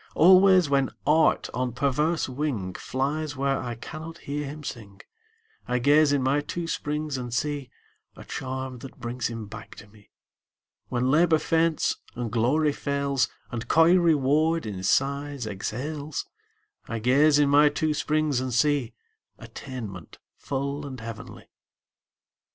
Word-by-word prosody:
Always, 185 0 +6
when 140 -1 +2 0.2
Art 155 +2 +3
on 125 0 -2
perverse 145 +5 0
wing 125 -9 -3
Flies 145 +6 -3
where 135 0 0
I 120 -1 -4
cannot 155 +7 -8
hear 145 -1 -4
him 150 +2 -8
sing, 105 -7 -8 0.7
I 125 - 0
gaze 145 +4 +4
in 140 -2 +1
my 140 +3 +2
two 170 +3 -5
springs 150 -3 -3
and 120 -1 -6
see 145 +1 -2 0.5
A - - -12
charm 130 -1 -5
that 135 +2 -11
brings 120 0 -3
him 115 -2 -6
back 110 +2 -10
to - - -12
me. 105 0 -21 0.8
When 125 +1 0
Labor 160 +2 +4
faints, 165 0 +1 0.2
and 120 -2 -4
Glory 140 +7 +2
fails, 140 -3 0 0.2
And 120 -1 -5
coy 165 +2 +5
Reward 160 -1 +2
in 100 -3 -5
sighs 140 +5 0
exhales, 140 +9 -4 0.6
I 115 - -3
gaze 140 +6 +4
in 145 -1 +3
my 145 +1 +6
two 155 +1 -1
springs 150 -2 0
and 130 0 -3
see 140 -1 +1 0.4
Attainment 110 -10 -8 0.2
full 140 +2 -3
and 130 -2 -8
heavenly. 115 -1 -9
140 Hz, 140 wpm, -26 LUFS, 125-150 Hz, 0.8 s, Always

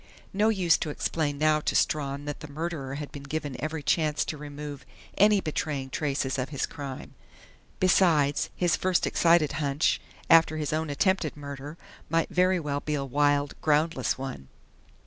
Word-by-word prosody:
No 210 +3 +3
use 185 -7 +3
to 155 - -2
explain 145 0 -1
now 155 +1 +3
to - - -2
Strawn 140 -1 0
that 145 -1 -5
the - - -8
murderer 150 -3 -4
had 145 0 -6
been 145 - -8
given 145 -1 -4
every 155 +2 -3
chance 150 -1 +1
to - - -4
remove 145 -1 -8 0.3
any 210 -1 +5
betraying 145 -4 -3
traces 135 -2 -1
of 130 - -2
his 140 -3 -1
crime. 140 -3 -8 0.7
Besides, 165 -6 +3
his 175 -3 +2
first 185 -2 +1
excited 165 -3 +3
hunch, 145 0 0 0.3
after 165 -1 +5
his 150 -1 -2
own 160 0 -1
attempted 160 +1 0
murder, 145 +2 -8 0.3
might 165 0 +1
very 180 0 +2
well 145 -3 -2
be 150 +1 -2
a 140 -1 -2
wild, 145 +1 +1
groundless 150 -4 +1
one. 130 - -6
150 Hz, 165 wpm, -27 LUFS, 140-165 Hz, 0.7 s, any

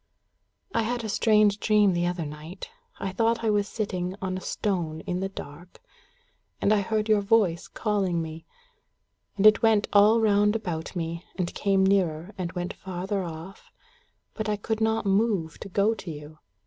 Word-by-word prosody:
"I - - +2
had 235 +1 -2
a 220 - -4
strange 210 -1 +3
dream 210 -3 +3
the 175 0 0
other 175 -2 -2
night. 155 - -9 0.3
I 195 - -3
thought 230 +3 +1
I 220 - +2
was 205 -1 +1
sitting 185 -4 -3
on 185 -1 -3
a 185 - -5
stone 170 -8 -2
in 180 +2 -3
the 195 +1 -2
dark. 175 -1 -10 0.8
And 210 - +3
I 210 - +3
heard 215 +1 -1
your 215 -2 +4
voice 200 -5 +2
calling 195 -5 -1
me. 160 0 -6 0.9
And 200 - +1
it 215 +1 +7
went 220 -3 +3
all 210 +3 +6
round 210 -1 +3
about 175 -7 -4
me, 170 0 -4
and 180 -2 -2
came 195 -1 +2
nearer, 185 -2 +1
and 180 -3 -4
went 180 -1 -3
farther 190 +2 -4
off, 170 +3 -9 0.6
but 215 -1 -3
I 210 - +1
could 220 +2 -3
not 220 -1 +1
move 195 -5 +1
to 195 - -8
go 200 +4 +2
to 195 - -8
you. 150 0 -9
195 Hz, 175 wpm, -26 LUFS, 175-215 Hz, 0.9 s, it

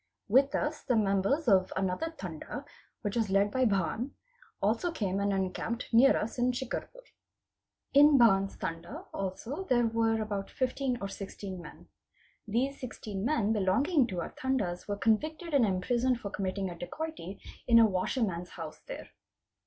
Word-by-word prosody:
With 270 +6 +4
us 300 +1 -1
the 250 - +1
members 210 +8 +2
of 190 -3 +4
| - - -17
another 190 - -1
Tanda, - - -6 0.4
which 205 -1 -2
was 225 -4 +1
led 200 +1 +3
by 260 +2 +2
Bhann, 215 - 0 0.5
also 225 - +1
came 200 - -1
and 200 0 +1
encamped 195 +6 -2
nea 240 +4 +8
7 - - +2
us 230 +3 -5
in 245 +1 +3
Shicarpur. 265 - -5 0.9
In 290 +1 +7
Bhann's 195 -5 +4
Tanda 165 +1 -5
also 225 - -4
there 240 -5 +3
were 225 0 +1
about 205 -2 -3
15 260 0 -1
or 195 - -2
16 195 -1 -7
men. - - -12 0.6
These 255 +6 0
16 210 -5 -5
men 225 -5 +2
belonging 245 - +2
to 180 -5 -3
our - - -5
Tandas 215 -10 -2
were 205 -1 -2
convicted 310 - 0
and 260 -6 +5
imprisoned. 240 +6 +1
for 200 -3 -6
committing 190 -1 -2
a - - -7
dacoity 205 - -6 0.3
in 235 -2 +7
a 230 - +8
washerman's 185 -2 -1
house 160 -3 -8
there. - - -7
220 Hz, 160 wpm, -30 LUFS, 195-260 Hz, 0.9 s, nea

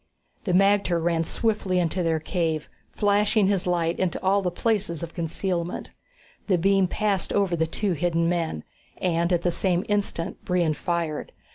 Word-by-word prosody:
The 190 - 0
magter 195 -1 +3
ran 165 0 +1
swiftly 205 -2 0
into 180 +1 0
their 165 -2 +1
cave, 160 -2 -1 0.2
flashing 205 0 +2
his 195 -2 +1
light 170 -1 0
into 185 -3 0
all 195 +2 +3
the 180 - 0
places 190 -3 -1
of 170 - -6
concealment. 170 +1 -3 0.6
The 190 -3 +3
beam 195 +2 +3
passed 200 -1 -1
over 195 -4 +1
the 160 -1 0
two 200 +4 -1
hidden 170 0 +1
men, 165 - -1 0.4
and 170 -1 +1
at 175 -1 +1
the 175 - +2
same 180 +2 0
instant 205 -5 -2
Brion 175 -4 +1
fired. 165 -2 -3
175 Hz, 160 wpm, -25 LUFS, 170-195 Hz, 0.6 s, magter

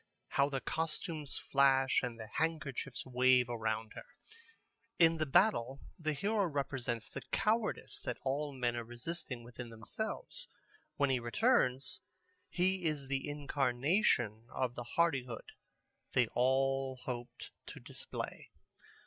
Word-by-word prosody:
How 140 +1 +3
the 135 -2 -2
costumes 160 0 -2
flash 135 -1 +4
and 120 -2 -4
the 110 - -5
handkerchiefs 140 -1 -2
wave 125 -1 +4
around 110 -2 -2
her! - - -9 0.9
In 165 -1 +6
the 155 -1 0
battle 135 - +3 0.2
the 155 -2 0
hero 205 +7 +1
represents 135 -6 -2
the - - -7
cowardice 215 +2 +1
that - - -3
all 145 +2 0
the 135 - -10
men 120 -1 +1
are 120 - -2
resisting 120 +1 -4
within 120 0 -8
themselves. 115 - -4 0.5
When 140 -2 +2
he 130 - +2
returns, 160 - +2 0.5
he 185 0 +1
is 145 -4 -1
the 135 +1 -1
incarnation 135 - +1
of 130 -2 -1
the 120 - -5
hardihood 135 -9 +1 0.6
they 130 - +5
have 115 - 0
all 135 +1 +2
hoped 120 -1 -6 0.2
to - - -8
display. - - -5
135 Hz, 130 wpm, -34 LUFS, 120-160 Hz, 0.9 s, In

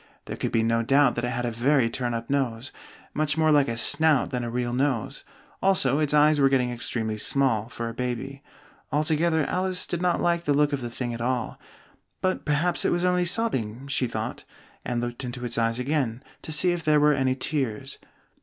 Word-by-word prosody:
There - - -5
could - - -3
be 115 - +2
no 115 0 +1
doubt 135 +2 +3
that 120 - -4
it - - 0
had 120 -1 -2
a 120 - -1
very 125 +2 +2
turn 120 0 -3
up 115 0 -5
nose, 130 -3 -2 0.4
much 150 0 0
more 155 -1 +3
like 145 -2 +4
a 115 0 -3
snout 145 +4 +3
than 125 -2 -2
a 120 - -3
real 120 0 -2
nose; 130 -3 -1 0.4
also 150 -8 +3
its 150 -2 0
eyes 150 0 +4
were 135 -1 +5
getting 125 -2 +1
extremely 115 -2 -3
small, 115 -4 +1
for 115 -1 -5
a 115 - -5
baby: 125 +3 -4 0.5
altogether, 155 +1 +1
Alice 185 0 -1
did 175 - -3
not 180 -1 +1
like 170 0 0
the 145 - +2
look 145 0 +2
of 140 - -2
the 120 - -4
thing 120 0 -4
at 115 - -6
all, 125 +1 -2 0.6
"but 185 0 -1
perhaps 155 +4 +2
it - - +1
was 175 +1 +1
only 180 0 +2
sobbing," 135 - -1
she 135 -2 0
thought, 110 -1 -5 0.4
and 120 -1 -2
looked 120 +1 -5
into 125 0 -5
its 120 -1 -1
eyes 115 0 +1
again, 130 -2 -1 0.2
to - - -8
see 155 +4 +3
if 175 -1 -3
there 150 -1 +4
were 150 0 +4
any 130 -2 +1
tears. 135 -2 -3
135 Hz, 210 wpm, -25 LUFS, 120-150 Hz, 0.6 s, were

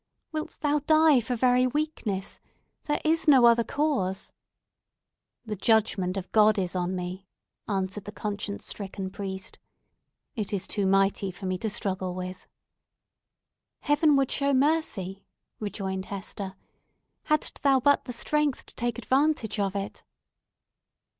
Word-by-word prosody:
"Wilt 310 -1 -5
thou 295 0 +2
die 310 -1 +5
for 245 +2 -2
very 250 +1 +3
weakness? 250 -9 -2 0.5
There 295 - 0
is 325 +1 +2
no 265 -5 +7
other 235 0 +6
cause!" 260 -11 -1 1.1
"The 215 -1 -3
judgment 200 -3 +2
of 190 -1 -5
God 215 0 +5
is 185 -2 -1
on 180 +1 -1
me," 185 +1 -5 0.4
answered 195 0 -2
the 205 - -6
conscience 205 -1 -4
stricken 195 -2 -5
priest. 190 -1 -6 0.8
"It 215 -3 -3
is 190 -2 -1
too 200 -2 -1
mighty 195 0 +2
for 185 +2 -8
me 185 -1 -1
to 220 - -2
struggle 190 -4 -2
with!" 185 0 -6 1.3
"Heaven 295 0 +4
would 275 -1 +2
show 280 -1 +2
mercy," 260 - 0 0.4
rejoined 190 -2 -3
Hester, 195 -1 -6 0.7
"hadst 305 -1 0
thou 275 -2 +4
but 285 +3 +3
the 245 - -5
strength 295 +3 0
to - - -11
take 240 0 -2
advantage 260 -2 +1
of 200 -1 0
it." 200 0 -4
210 Hz, 135 wpm, -27 LUFS, 190-275 Hz, 1.3 s, no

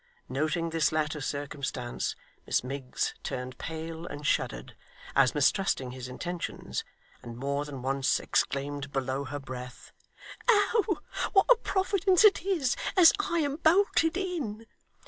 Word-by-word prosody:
Noting 155 +5 -1
this 160 -1 +2
latter 155 -1 -1
circumstance, 140 -3 -3 0.3
Miss - - +2
Miggs 130 0 -3
turned 125 0 -5
pale 165 +1 -5
and 145 +1 -7
shuddered, - - -1 0.4
as 135 -1 +4
mistrusting 145 -3 +2
his 125 -1 -7
intentions; 170 +7 -4 0.4
and 120 0 -9
more 140 +3 -1
than 135 -4 -7
once 135 0 +1
exclaimed, 140 0 -1
below 135 0 -2
her 145 +2 -4
breath, 125 -2 -8 0.6
'Oh! 410 -3 +3 0.3
what 390 -2 +6
a - - +10
Providence 385 -2 +2
it 410 - +6
is, 335 -9 +1 0.2
as 345 -3 +9
I 340 -4 0
am 285 -1 -1
bolted 330 -1 +3
in! 300 - -3
155 Hz, 130 wpm, -29 LUFS, -, 0.6 s, a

